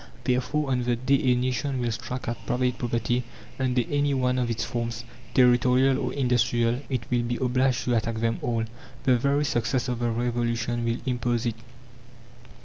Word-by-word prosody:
Therefore, 130 +3 0
on 125 -1 +1
the 120 0 +1
day 130 +3 +2
a - - +4
nation 130 +2 -1
will 120 -1 0
strike 125 +3 -5
at 120 - -4
private 125 0 0
property, 120 +1 0 0.4
under 125 -2 +1
any 145 -1 +1
one 125 -1 +1
of 120 -1 0
its 115 0 -1
forms, 115 -1 -3 0.3
territorial 125 +1 +4
or 125 -2 -2
industrial, 120 -2 +1
it 125 -4 -1
will 120 -1 +3
be 120 0 -2
obliged 130 -1 +1
to 125 - 0
attack 115 0 0
them 115 +1 0
all. 115 -2 0 0.4
The 130 -2 +4
very 140 +3 +2
success 125 0 0
of 120 -1 -2
the 120 -1 0
Revolution 120 0 -1
will 115 0 0
impose 120 -2 0
it. 115 -2 -1
125 Hz, 175 wpm, -26 LUFS, 120-130 Hz, 0.4 s, a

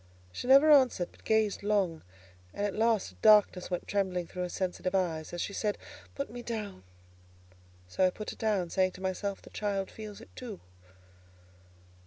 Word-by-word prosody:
She 90 - -6
never 275 +4 +7
answered, 260 -11 +4
but - - -22
gazed 220 -2 +1
long, 200 -6 0 0.5
and 205 - -1
at 205 - -2
last 225 -2 +1
a - - -21
darkness 210 -4 +5
went 180 -1 -3
trembling 185 -3 -1
through 180 +2 -7
her 180 - -2
sensitive 185 +1 -2
eye, 170 -4 0
as 175 - -5
she 200 - -3
said, 210 0 -1 0.4
"Put 280 -3 -4
me 245 +1 -7
down." 215 - -5 1.1
So 185 - +2
I - - +2
put 210 +3 -6
her - - -9
down, 200 -6 0
saying 185 -1 +2
to 185 - -12
myself: 195 +1 -3
"The - - -14
child 200 -2 -2
feels 215 -1 -9
it 230 - -16
too." 230 -7 -7
200 Hz, 180 wpm, -30 LUFS, 185-220 Hz, 1.1 s, never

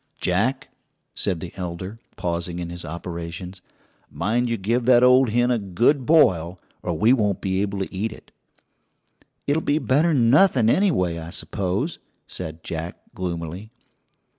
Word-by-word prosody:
"Jack," 110 +9 0 0.4
said 90 -4 -2
the 90 - -7
elder, 90 +4 -6 0.2
pausing 85 0 -3
in 85 -1 -5
his 85 0 -6
operations, 85 +2 -7 0.5
"mind 120 +4 0
you 115 - 0
give 115 +5 0
that 125 -1 +6
old 125 0 +6
hen 120 +3 +2
a 120 - +2
good 120 - +1
boil, 90 - +4 0.2
or 85 -3 -2
we 110 +7 +5
won't 105 -6 +1
be 95 0 -1
able 100 -1 -2
to 95 0 -4
eat 105 +4 -2
it." - - -14 1.1
"It'll 145 +3 +1
be 145 - +1
better'n 140 -5 +3
nothing, 135 - +5
anyway, 90 - +1
I 80 0 -7
suppose," 100 - -2 0.3
said 80 +1 -7
Jack 80 +1 -5 0.2
gloomily. 90 +2 -5
95 Hz, 145 wpm, -23 LUFS, 85-125 Hz, 1.1 s, that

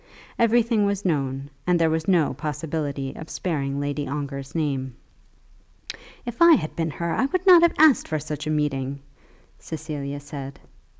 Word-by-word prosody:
Everything 230 -2 +3
was 200 0 -2
known, 140 -4 -1 0.2
and 180 -1 +4
there 165 - +4
was 160 0 -1
no 175 -6 +3
possibility 145 -2 -4
of 160 - -9
sparing 140 -6 -2
Lady 145 0 -2
Ongar's 140 0 -5
name. 135 -5 -2 1.3
"If 240 +3 -6
I 340 0 +9
had 155 -2 -3
been 165 -1 -1
her 170 +2 -3
I - - +1
would 365 +6 -2
not 360 -3 +9
have 340 -1 +4
asked 310 -3 +5
for 155 - -1
such 150 0 -5
a - - -1
meeting," 140 -3 -1 0.6
Cecilia 145 -3 -5
said. 140 -1 -8
150 Hz, 160 wpm, -24 LUFS, 140-180 Hz, 1.3 s, I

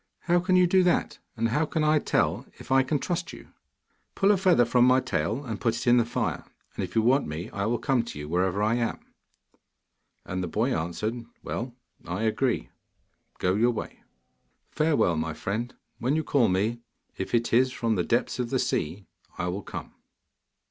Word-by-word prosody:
'How 175 0 +2
can 185 +1 +1
you 180 0 +6
do 185 +2 +4
that, 180 -1 +1 0.2
and 115 +1 +1
how 150 +7 +1
can 155 0 -1
I 155 0 +4
tell - - 0
if - - -11
I 135 0 +6
can 140 +3 0
trust 175 +4 -3
you?' - - -12 0.7
'Pull 195 0 +4
a 205 - +4
feather 180 -10 +4
from 120 +1 +3
my 130 +1 +5
tail, 110 - -2
and 110 -5 -5
put 115 -1 +1
it - - -5
in 120 0 +5
the 120 - +3
fire, 115 - -2 0.3
and - - -3
if - - -6
you 110 - +3
want 130 +4 +3
me 80 +3 -5
I 100 +1 -2
will 120 +1 +1
come 130 +1 +1
to 115 - -8
you, 75 0 -6
wherever 90 +4 0
I 110 +2 +2
am.' 115 -1 -3 1.1
And 95 0 -3
the - - -2
boy 115 +9 0
answered, 105 +9 -3 0.2
'Well, 120 0 -4 0.3
I 90 +5 -2
agree; 115 +2 0 0.7
go 90 - +1
your 115 +5 +3
way.' 120 - -5 0.7
'Farewell, 150 - +2
my 80 0 -2
friend. 115 +9 -3 0.3
When 130 +5 +1
you 160 - 0
call 135 -7 +3
me, 105 +6 0 0.4
if 95 - -2
it 115 0 0
is 130 +2 +4
from 115 -3 -1
the 90 -4 +1
depths 120 +5 0
of 120 -1 -1
the - - +1
sea, 95 +6 -2 0.3
I 90 - -1
will 95 +3 -3
come. - - -8
120 Hz, 200 wpm, -27 LUFS, 100-135 Hz, 1.1 s, you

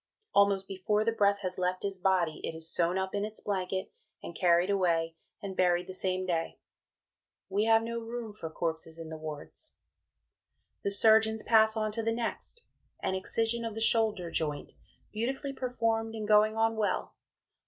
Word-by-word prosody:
Almost 200 -1 +3
before 210 +3 0
the 230 - +3
breath 200 -2 +2
has 185 -1 -3
left 180 0 -1
his 195 -2 -3
body 180 -4 +1
it 160 - -4
is 160 0 -2
sewn 175 +2 +2
up 190 0 -2
in 205 0 -1
its 215 +1 -5
blanket, 190 -1 -3 0.3
and 170 - -8
carried 175 +2 +3
away 165 -4 +1 0.3
and 195 -1 -5
buried 180 -1 +2
the 185 - -8
same 185 0 0
day. 165 -2 -2 0.9
We 200 +2 +1
have 225 0 +4
no 235 0 -3
room 230 -1 -6
for 165 -6 -6
Corpses 160 0 -4
in 165 -1 -8
the 160 - -6
Wards. 155 - -9 1.1
The - - -1
Surgeons 220 +2 +4
pass 220 -1 +4
on 215 -1 0
to 225 +2 -2
the 225 0 0
next, 240 - -4 0.4
an 190 - 0
excision 225 +5 -1
of 225 -2 -4
the - - -4
shoulder 220 -6 +2
joint, 150 -3 -2 0.4
beautifully 265 +5 -3
performed 225 -3 -1
and 215 -1 -4
going 215 +1 +4
on 225 0 +2
well. 205 -4 -1
200 Hz, 175 wpm, -30 LUFS, 180-225 Hz, 1.1 s, have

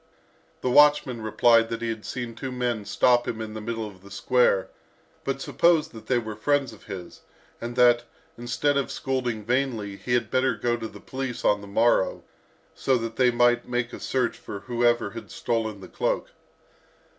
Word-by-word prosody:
The 125 - 0
watchman 145 -4 +5
replied 115 +1 +4
that 115 0 -4
he 115 - -1
had 110 -1 -5
seen 120 -2 -4
two 130 +4 -6
men 120 -4 -2
stop 120 +3 +3
him 110 - -3
in 110 -1 -5
the 110 - -6
middle 115 0 -3
of 95 -3 -11
the 100 - -14
square, 100 -1 +2 0.6
but 135 0 -2
supposed 170 -3 +3
that 110 -2 -12
they 130 - +2
were 110 -2 -4
friends 135 +2 0
of 105 - -16
his, 95 -4 -8 0.4
and 120 +1 -5
that, 120 -1 +5 0.3
instead 120 +4 0
of 140 -1 0
scolding 130 -5 -2
vainly, 120 -5 -1
he 120 +3 -1
had 120 -3 -1
better 130 -1 +2
go 120 +2 0
to 115 -1 -5
the - - -12
police 130 -2 -5
on 105 -1 +3
the 100 - -10
morrow, 110 -1 +2 0.5
so 130 -1 +1
that 115 -1 -5
they 125 -1 +5
might 120 0 +2
make 120 -1 -1
a - - -7
search 125 -3 -1
for 100 - -7
whoever 120 -3 +1
had 115 +1 -9
stolen 110 -3 -2
the - - -9
cloak. - - -1
120 Hz, 190 wpm, -25 LUFS, 110-125 Hz, 0.6 s, watchman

